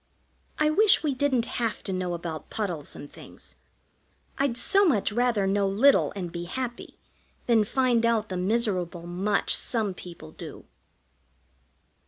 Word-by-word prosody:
I 305 Hz, 0 st, +3 dB
wish 405 Hz, +2 st, +5 dB
we 295 Hz, -3 st, +1 dB
didn't 260 Hz, -3 st, +1 dB, 0.2 s
have 225 Hz, -4 st, -2 dB
to 190 Hz, -, -3 dB
know 180 Hz, -1 st, -2 dB
about 165 Hz, -2 st, -6 dB
puddles 180 Hz, -9 st, -4 dB
and 145 Hz, -, -10 dB
things! -, -, -13 dB, 0.8 s
I'd 275 Hz, -4 st, +1 dB
so 395 Hz, +9 st, +4 dB
much 265 Hz, -, +2 dB
rather 235 Hz, -3 st, +1 dB
know 195 Hz, +1 st, +1 dB
little 230 Hz, +9 st, +4 dB
and 180 Hz, -4 st, -5 dB
be 170 Hz, 0 st, -5 dB
happy 240 Hz, +6 st, -5 dB, 0.5 s
than 230 Hz, -3 st, +4 dB
find 245 Hz, 0 st, +2 dB
out 230 Hz, -2 st, +1 dB
the 185 Hz, -, -3 dB
miserable 185 Hz, -4 st, -1 dB
much 190 Hz, +4 st, 0 dB
some 220 Hz, -5 st, -2 dB
people 170 Hz, -3 st, -11 dB
do. -, -, -10 dB
210 Hz, 145 wpm, -26 LUFS, 180-250 Hz, 0.8 s, wish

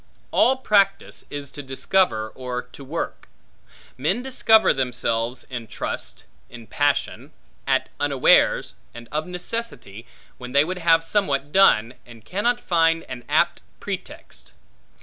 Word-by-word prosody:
All 265 Hz, +1 st, +4 dB
practice 200 Hz, -6 st, +1 dB
is 145 Hz, -1 st, -6 dB
to 145 Hz, -, -8 dB
discover, 135 Hz, -3 st, 0 dB
or 125 Hz, +1 st, -5 dB
to 125 Hz, +3 st, -14 dB
work. 155 Hz, +5 st, -5 dB, 0.7 s
Men 190 Hz, -, 0 dB
discover 225 Hz, -4 st, +4 dB
themselves 125 Hz, -2 st, -1 dB
in 120 Hz, -3 st, -7 dB
trust, -, -, -5 dB, 0.3 s
in 120 Hz, -2 st, -11 dB
passion, 145 Hz, +4 st, -1 dB, 0.3 s
at -, -, +1 dB
unawares, 140 Hz, -3 st, +3 dB, 0.2 s
and 120 Hz, 0 st, -10 dB
of 155 Hz, +3 st, -2 dB
necessity, 180 Hz, -, -5 dB, 0.3 s
when 125 Hz, 0 st, -8 dB
they 140 Hz, +2 st, +5 dB
would 180 Hz, +2 st, -4 dB
have 165 Hz, -1 st, +4 dB
somewhat 145 Hz, -7 st, -1 dB
done, 125 Hz, -, +4 dB
and 115 Hz, -3 st, -15 dB
cannot 235 Hz, -, 0 dB
find 165 Hz, -4 st, +2 dB
an 125 Hz, -, -7 dB
apt -, -, +2 dB, 0.2 s
pretext. -, -, -8 dB
145 Hz, 130 wpm, -23 LUFS, 125-185 Hz, 0.7 s, they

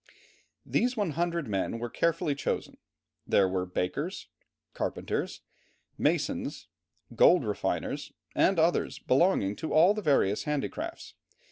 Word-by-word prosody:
These 250 Hz, +1 st, 0 dB
100 170 Hz, -, -1 dB
men 100 Hz, +2 st, -1 dB
were 120 Hz, +1 st, -3 dB
carefully 165 Hz, +2 st, 0 dB
chosen; 140 Hz, -, -3 dB, 0.5 s
there 95 Hz, -, +4 dB
were 95 Hz, 0 st, -2 dB
bakers, 135 Hz, -, -3 dB, 0.4 s
carpenters, -, -, -3 dB, 0.5 s
masons, -, -, -1 dB, 0.5 s
gold -, -, +5 dB
refiners, -, -, -2 dB, 0.2 s
and 195 Hz, -, +3 dB
others 165 Hz, +2 st, +2 dB
belonging 130 Hz, -, +2 dB
to 160 Hz, -, -4 dB
all 170 Hz, +6 st, +6 dB
the 215 Hz, -, -4 dB
various 135 Hz, -, +2 dB
handicrafts. 230 Hz, -, -4 dB
155 Hz, 110 wpm, -29 LUFS, 115-185 Hz, 0.5 s, all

